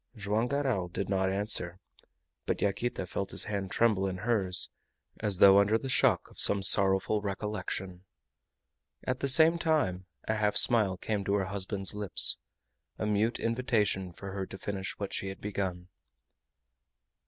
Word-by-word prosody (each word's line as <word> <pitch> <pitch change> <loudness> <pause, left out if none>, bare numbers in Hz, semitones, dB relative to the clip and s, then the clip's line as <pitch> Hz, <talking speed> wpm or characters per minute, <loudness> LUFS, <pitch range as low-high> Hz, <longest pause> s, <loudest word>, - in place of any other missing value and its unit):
Joam 105 +2 -1
Garral 130 -9 -1
did 95 +2 -5
not 95 -1 +1
answer, 95 -3 -1 0.7
but - - -1
Yaquita 100 0 -2
felt 100 +2 -4
his - - -2
hand 100 -3 -4
tremble 105 -3 +1
in 95 -1 -4
hers, 95 -3 -1 0.5
as 105 -4 0
though 100 +1 +7
under 105 +2 +3
the 135 +3 -6
shock 125 - +2
of - - -7
some 100 -1 +5
sorrowful 95 +2 +3
recollection. 95 -2 -5 1.0
At 130 0 -2
the 140 - +1
same 160 +5 +7
time 95 - 0 0.2
a 110 - -1
half 105 -1 +1
smile 105 -6 +4
came 105 +2 -3
to 100 - +1
her 100 -2 0
husband's 95 0 -3
lips 105 -2 +1 0.6
a - - -3
mute 105 +3 0
invitation 110 -6 -1
for 95 +3 -9
her 95 -1 -5
to 95 - -9
finish 95 -1 -5
what 100 - -5
she 95 - -3
had 95 0 -7
begun. 95 -3 -4
100 Hz, 155 wpm, -29 LUFS, 95-110 Hz, 1.0 s, though